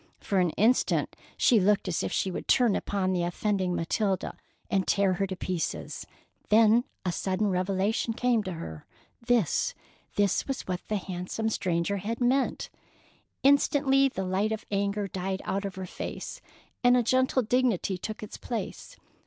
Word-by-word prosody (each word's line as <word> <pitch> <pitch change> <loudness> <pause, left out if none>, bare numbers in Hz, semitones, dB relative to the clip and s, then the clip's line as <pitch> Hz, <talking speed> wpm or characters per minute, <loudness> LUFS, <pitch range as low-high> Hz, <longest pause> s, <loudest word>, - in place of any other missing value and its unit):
For 195 - 0
an 180 -1 +3
instant 230 +5 +2 0.2
she 235 - +5
looked 200 +1 +2
as 170 - 0
if - - -2
she 190 - 0
would - - -5
turn 240 -5 +4
upon 190 -2 -1
the 180 - 0
offending 185 +1 0
Matilda 195 +3 -1 0.3
and 190 -2 0
tear 200 -2 +3
her 195 +2 -1
to 190 - -4
pieces. 180 -2 -4 0.4
Then 225 +3 +5 0.2
a 180 - +1
sudden 190 +4 -1
revelation 195 +5 0
came 245 -2 +2
to 185 - -3
her: 80 - -8 0.4
this, 235 -8 +1 0.4
this 200 -2 +1
was 270 -1 -2
what 180 -1 -3
the 215 - 0
handsome 185 +4 -3
stranger 185 -1 0
had 220 +4 -3
meant! 260 +2 +1 0.7
Instantly 275 0 +4
the 190 -7 -4
light 195 +4 0
of 220 -1 -4
anger 200 0 0
died 190 +1 -3
out 195 +1 -1
of 195 - -5
her 190 0 -5
face, - - -6 0.4
and 245 0 +6
a 245 - +3
gentle 260 +2 +2
dignity 230 -5 +1
took 215 +3 -6
its 210 - -8
place. 235 -2 -5
200 Hz, 160 wpm, -28 LUFS, 185-230 Hz, 0.7 s, and